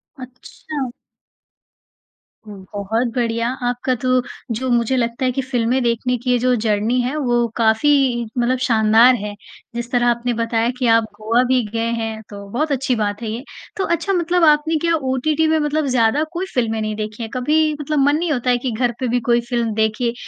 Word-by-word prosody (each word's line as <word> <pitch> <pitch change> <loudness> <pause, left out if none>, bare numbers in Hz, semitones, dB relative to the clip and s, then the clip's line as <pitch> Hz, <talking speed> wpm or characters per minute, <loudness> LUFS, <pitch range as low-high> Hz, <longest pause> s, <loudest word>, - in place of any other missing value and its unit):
अच्छा! 260 +1 -7 1.6
हुँ, 210 -2 -10 0.2
बहुत 215 +4 -1
बढ़िया! 230 -1 0 0.2
आपका 245 +1 -1
तो 255 0 +2 0.3
जो 260 +3 -3
मुझे 240 +2 +2
लगता 235 +2 -1
है 255 - +2
कि 270 +2 -2
फिल्में 255 -1 0
देखने 240 +1 0
की 250 +2 -2
ये 250 - +4
जो 250 +1 +2
जर्नी 220 +2 0
है 250 +4 -2
वो 240 -4 +1
काफ़ी 225 +5 +3 0.5
मतलब 245 +1 +1
शानदार 225 +1 +5
है। 210 -2 -5 0.4
जिस 240 0 -5
तरह 245 -1 +2
आपने 240 0 +1
बताया 230 0 0
कि 250 -1 0
आप 230 0 +5
गोवा 225 +3 +1
भी 255 0 +3
गए 230 0 -1
हैं 220 -1 -4
तो 200 -1 -9
बहुत 300 +6 -1
अच्छी 265 -2 0
बात 205 -1 -2
है 225 - -4
ये। 235 +4 -5 0.3
तो 390 - 0
अच्छा 340 +4 0
मतलब 350 0 +1
आपने 305 +1 +3
क्या 335 0 +1
ओटीटी 300 +2 0
में 315 0 +3
मतलब 300 0 0
ज़्यादा 250 +3 +2
कोई 360 +2 -2
फिल्में 225 -3 0
नहीं 215 0 -2
देखी 215 +2 -5
हैं? 225 - -5
कभी 305 +5 +2
मतलब 295 +1 -1
मन 285 +2 +4
नहीं 335 0 -1
होता 255 -3 -1
है 245 - +4
कि 245 +1 -3
घर 240 +2 0
पे 260 - -1
भी 245 +1 +1
कोई 240 0 +4
फिल्म 235 -3 0
देखे 220 +2 0
245 Hz, 195 wpm, -19 LUFS, 230-265 Hz, 1.6 s, शानदार